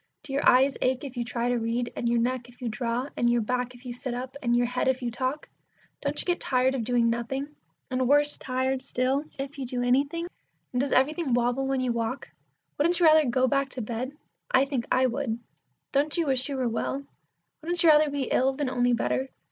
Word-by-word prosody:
Do 290 -2 -7
your 280 - +4
eyes 265 +2 +4
ache 255 +1 +1
if 270 -2 -7
you 240 - -1
try 240 0 -2
to 245 -1 +1
read, 235 +1 -2
and 235 - -1
your 235 - +2
neck 245 0 -1
if 245 - -19
you 245 -3 -3
draw, 235 +3 -2
and 240 - +2
your 240 0 +3
back 250 +2 -2
if 245 +1 -17
you 245 - -4
sit 250 0 -5
up, 255 +2 -6
and 240 -1 +2
your 245 0 +3
head 250 +2 -1
if 260 -1 +1
you 240 - -1
talk? 260 +5 -3 0.5
Don't - - -2
you - - -4
get 355 -1 0
tired 255 0 +2
of 260 -4 -2
doing 240 0 +2
nothing, 235 +5 -2 0.4
and 255 0 +1
worse 290 +1 +4
tired 260 0 -1
still 260 +1 0
if 275 +1 -6
you 265 - -3
do 245 0 -2
anything; 280 +7 +1 0.5
and 250 - +1
does 280 - -1
everything 280 0 +2
wobble 245 +2 +1
about - - -2
when 270 -1 +1
you 255 -1 0
walk? 235 +3 -3 0.5
Wouldn't 340 +4 +2
you 345 - +4
rather 310 -3 +6
go 260 +1 +2
back 275 0 +1
to 255 - -5
bed? 240 +5 -4 0.4
I 260 +1 +4
think 270 -4 -3
I 260 +1 +4
would. 250 -2 -1 0.5
Don't 290 +3 +1
you 335 - +2
wish 265 -1 +2
you 275 - -3
were 255 -2 0
well? 265 +4 -2 0.6
Wouldn't 345 +2 -1
you 335 - +7
rather 305 0 +6
be 285 -1 -2
ill 260 +1 +2
than 270 -1 -2
only 245 -1 +2
better? 260 +3 0
255 Hz, 235 wpm, -27 LUFS, 245-275 Hz, 0.6 s, you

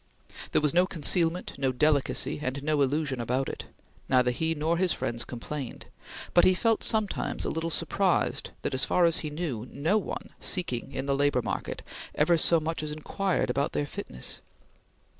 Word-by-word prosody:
There - - +3
was 150 - +2
no 180 +2 +4
concealment, 170 +1 +3
no 135 -1 +1
delicacy, 140 +1 +1
and 135 0 -3
no 150 -1 +1
illusion 140 -2 0
about 125 +3 -1
it. - - -6 0.4
Neither 125 -1 +4
he 160 +6 -1
nor 160 +3 0
his 180 0 +2
friends 115 -5 -2
complained; 130 +2 -6 0.5
but 175 - +6
he 185 - +5
felt 225 +3 +2
sometimes 215 -2 +1
a - - -1
little 165 +1 -2
surprised 185 +3 +1
that, - - -2
as 130 +1 +3
far 180 +1 +3
as 165 -1 +3
he 155 - -4
knew, 145 -7 -4
no 160 +10 +1
one, - - -6
seeking 135 -10 -1
in 135 - -4
the 140 0 +1
labor 140 -3 +2
market, - - -4 0.3
ever 155 +3 +4
so 165 +1 +4
much 160 +1 -3
as 155 -1 -4
inquired 165 0 -1
about 140 +3 -1
their 145 - 0
fitness. 60 - -6
150 Hz, 180 wpm, -28 LUFS, 135-170 Hz, 0.5 s, but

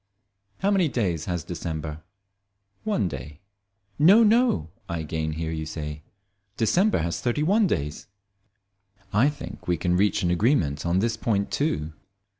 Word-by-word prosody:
How 200 +2 +2
many 190 -4 +3
days 90 - -1
has 85 -3 -2
December? 80 -2 -5 0.8
One 210 - 0
day. 70 -1 -7 0.6
"No, 195 +10 +7
no," 220 - +3 0.2
I 85 - -2
again 80 0 -3
hear 80 +1 -3
you 80 -1 -4
say, 75 -1 -5 0.6
"December 120 - +2
has 85 0 -2
thirty 125 +5 0
one 200 +5 +3
days." 75 - -3 1.1
I 115 +8 +4
think 145 - -9
we 90 -1 +1
can 90 -1 +1
reach 100 0 +2
an 85 - +2
agreement 85 - +1
on 85 +2 +2
this 115 +1 0
point 100 -3 0
too. 80 - -1
90 Hz, 145 wpm, -25 LUFS, -, 1.1 s, No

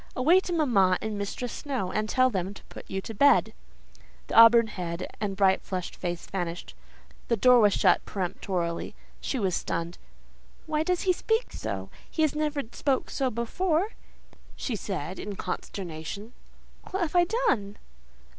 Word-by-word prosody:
Away 320 +9 +5
to 375 - -5
mamma 205 - +3
and 220 -1 -4
Mistress 205 +4 -4
Snowe, 255 -11 -3
and 215 +2 -1
tell 255 +1 +3
them 190 -1 -3
to - - -13
put - - -11
you 190 - -2
to 225 - -7
bed." 280 +7 +4 0.8
The - - -5
auburn 230 +1 +9
head 180 -4 -5
and 200 -2 -2
bright 190 -1 +4
flushed 185 -2 -5
face 175 -1 -4
vanished,—the 180 +5 -6
door 245 -2 +6
shut - - +3
peremptorily. 180 -2 -3 0.2
She 270 - -3
was 190 -6 0
stunned. 170 +1 -3 0.7
"Why 305 -1 0
does 360 +2 0
he 370 -2 +3
speak 445 +6 -1
so? - - -5 0.2
He 315 - +2
never 300 -1 -1
spoke 275 -3 -1
so 265 -2 0
before," 315 - 0 0.7
she 245 - -3
said 185 -4 -4
in 205 -1 -5
consternation. 190 +5 -6 0.6
"What 385 0 -2
have 340 +1 -1
I 350 0 +6 0.2
done?" 205 - 0
215 Hz, 150 wpm, -27 LUFS, 190-285 Hz, 0.8 s, auburn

